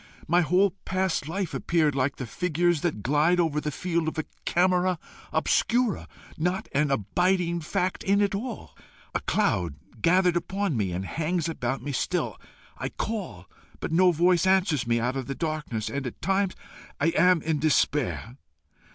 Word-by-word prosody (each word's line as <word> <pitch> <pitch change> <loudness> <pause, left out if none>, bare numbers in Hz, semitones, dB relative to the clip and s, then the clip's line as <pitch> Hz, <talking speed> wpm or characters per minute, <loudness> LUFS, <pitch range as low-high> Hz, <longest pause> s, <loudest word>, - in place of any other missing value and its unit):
My 175 +2 +4
whole 180 +4 +3
past 185 -5 -1
life 185 +2 -3
appeared 160 -4 +1
like 135 +1 0
the 130 - -5
figures 175 +4 0
that 150 - -2
glide 150 +7 +3
over 155 -3 +1
the 150 - -2
field 170 +2 -1
of 160 - -3
a 160 - -1 0.2
camera 180 0 +2 0.3
obscura 240 -3 +1 0.3
not 180 +4 -1
an 145 +1 +2
abiding 170 - +1
fact 180 +4 -1
in 200 +1 +3
it 205 -1 +2
all. 225 +3 -5 0.4
A - - +1
cloud 85 -5 0 0.3
gathered 180 0 +4
about 195 +2 -1
me, 105 -9 0
and 90 +2 -3
hangs 165 - -1
about 130 -5 -3
me 145 - -3
still. 130 - -2 0.4
I - - -2
call, 195 - -4 0.3
but - - -4
no 180 +2 +5
voice 175 +2 +3
answers 185 - +2
me 115 0 +2
out 125 +3 -1
of 135 -2 -3
the 135 - -3
darkness, 150 -9 -3
and 140 -2 -3
at 120 - -8
times 195 +1 0 0.4
I 160 - +3
am 175 0 +4
in 160 -2 0
despair. 145 -4 +1
165 Hz, 165 wpm, -26 LUFS, 145-185 Hz, 0.4 s, no